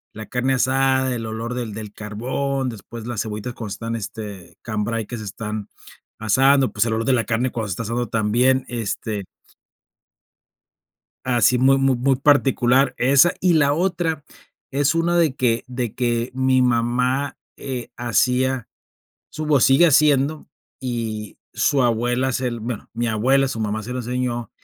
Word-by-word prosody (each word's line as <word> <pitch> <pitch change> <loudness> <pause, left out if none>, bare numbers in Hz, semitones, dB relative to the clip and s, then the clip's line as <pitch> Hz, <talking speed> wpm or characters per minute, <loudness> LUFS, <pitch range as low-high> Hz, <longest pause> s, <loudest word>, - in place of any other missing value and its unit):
la 110 - -7
carne 125 +3 0
asada, 130 0 +2
el 115 - -4
olor 115 +2 -4
del 115 -4 -4
del 105 -1 -7
carbón, 130 +5 -3
después 115 +1 -9
las 120 -3 -2
cebollitas 110 +2 -5
cuando 110 -4 -7
están, 115 +2 -4
este 100 -4 -8
cambray 110 0 -2
que 120 - -6
se 110 - -7
están 105 +1 -5 0.5
asando, 135 +5 +3
pues 105 +2 +2
el 110 - -1
olor 115 0 -1
de 135 - +3
la 115 -2 +1
carne 120 +2 0
cuando 110 -3 -3
se - - -1
está 115 - -4
asando 120 +2 -2
también, 120 +4 +2
este 110 -3 -3 2.0
así 125 0 +3
muy 135 +2 +4
muy 135 -1 +3
muy 135 +2 +2
particular 135 -2 +3
esa. 140 +7 +5
Y 180 -1 +4
la 145 -2 +4
otra, 170 -3 -1 0.5
es 145 +3 +2
una 170 +1 +2
de 160 -6 +3
que 120 -2 +1
de 125 -3 -4
que 120 -1 0
mi 130 0 +3
mamá, 125 +3 +1 0.2
eh, 130 -3 -5
hacía 125 +1 +1 0.6
su 155 - -5
o 140 - +6
sigue 135 +8 +6
haciendo 150 -1 +3 0.3
y 115 -4 -4 0.2
su 135 -2 +2
abuela 120 +2 +1
se 125 0 -1
l 120 -1 -4
bueno, 115 0 -6
mi 120 0 -1
abuela, 130 +5 +2
su 115 - -4
mamá, 110 0 -2
se 120 - -6
lo - - -3
enseñó, 120 -1 -3
125 Hz, 165 wpm, -22 LUFS, 115-135 Hz, 2.0 s, o